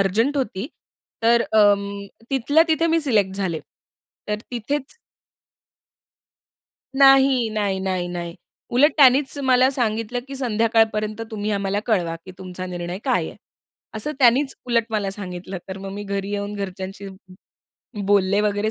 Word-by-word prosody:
Urgent 225 Hz, +9 st, +1 dB
होती. 235 Hz, -5 st, -2 dB, 0.6 s
तर 235 Hz, +1 st, +4 dB
अं, 200 Hz, -1 st, +3 dB, 0.2 s
तिथल्या 275 Hz, +4 st, +3 dB
तिथे 325 Hz, +1 st, +2 dB
मी 330 Hz, 0 st, +2 dB
सिलेक्ट 210 Hz, -10 st, +1 dB
झाले. 180 Hz, -5 st, -2 dB, 0.7 s
तर 210 Hz, 0 st, -1 dB
तिथेच 265 Hz, -, -3 dB, 2.0 s
नाही, 270 Hz, -3 st, +5 dB
नाही, 205 Hz, -3 st, -1 dB
नाही, 185 Hz, -2 st, -2 dB
नाही. 170 Hz, -1 st, -5 dB, 0.4 s
उलट 275 Hz, +6 st, +5 dB
त्यांनीच 275 Hz, 0 st, +5 dB
मला 260 Hz, -2 st, +4 dB
सांगितलं 230 Hz, -2 st, -1 dB
की 275 Hz, -, -6 dB
संध्याकाळपर्यंत 225 Hz, -3 st, +1 dB
तुम्ही 215 Hz, -1 st, -3 dB
आम्हाला 200 Hz, 0 st, -1 dB
कळवा, 180 Hz, -8 st, +1 dB
की -, -, -10 dB
तुमचा 185 Hz, -1 st, -7 dB
निर्णय 175 Hz, 0 st, -5 dB
काय -, -, +1 dB
आहे? -, -, -11 dB, 0.6 s
असं 220 Hz, +8 st, -3 dB
त्यानीच 265 Hz, +2 st, +4 dB
उलट 235 Hz, -2 st, +2 dB
मला 210 Hz, -3 st, -1 dB
सांगितलं. 185 Hz, -1 st, -6 dB
तर 190 Hz, 0 st, -6 dB
मग 195 Hz, 0 st, -7 dB
मी 205 Hz, -, -6 dB
घरी 200 Hz, 0 st, -3 dB
येऊन 205 Hz, 0 st, -3 dB
घरच्यांशी 195 Hz, 0 st, -6 dB, 1.0 s
बोलले 200 Hz, 0 st, +3 dB
वगैरे 210 Hz, +1 st, 0 dB
210 Hz, 135 wpm, -22 LUFS, 195-250 Hz, 2.0 s, नाही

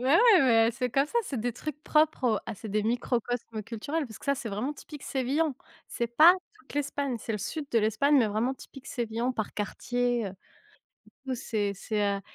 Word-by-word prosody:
Ouais, 270 Hz, +8 st, +4 dB, 0.2 s
mais 230 Hz, -3 st, +5 dB
c'est 250 Hz, +1 st, -2 dB
comme 275 Hz, +3 st, +2 dB
ça, 475 Hz, -, 0 dB
c'est 270 Hz, -, -4 dB
des 245 Hz, +1 st, -1 dB
trucs 295 Hz, +5 st, -6 dB
propres 305 Hz, -3 st, +2 dB
au -, -, 0 dB
ah -, -, -4 dB
c'est 215 Hz, +2 st, -8 dB
des 210 Hz, +1 st, 0 dB
microcosme 235 Hz, -1 st, -1 dB
culturels 280 Hz, +8 st, -3 dB
parce 220 Hz, -, -11 dB
que -, -, -14 dB
ça 280 Hz, -, +2 dB
c'est 235 Hz, -3 st, -5 dB
vraiment 215 Hz, +8 st, -2 dB
typique 295 Hz, 0 st, -11 dB
sévillan. 275 Hz, +3 st, 0 dB, 0.3 s
C'est 235 Hz, -, -2 dB
pas 310 Hz, +9 st, +8 dB, 0.2 s
toute 425 Hz, -, -15 dB
l'Espagne, 280 Hz, -2 st, -1 dB
c'est 225 Hz, -, -4 dB
le 210 Hz, -, -2 dB
sud 300 Hz, -, -4 dB
de 230 Hz, -, +3 dB
l'Espagne, 220 Hz, +7 st, +3 dB
mais 230 Hz, -, +4 dB
vraiment 225 Hz, +6 st, 0 dB
typique 270 Hz, 0 st, -13 dB
sévillan 235 Hz, 0 st, -2 dB
par 220 Hz, -4 st, -3 dB
quartier, 245 Hz, +2 st, -1 dB
heu, 190 Hz, -, -6 dB, 0.7 s
du -, -, -21 dB, 0.2 s
coup -, -, 0 dB
c'est 205 Hz, -4 st, -1 dB
c'est 210 Hz, +2 st, -2 dB
heu -, -, -8 dB
245 Hz, 210 wpm, -28 LUFS, 220-280 Hz, 0.7 s, pas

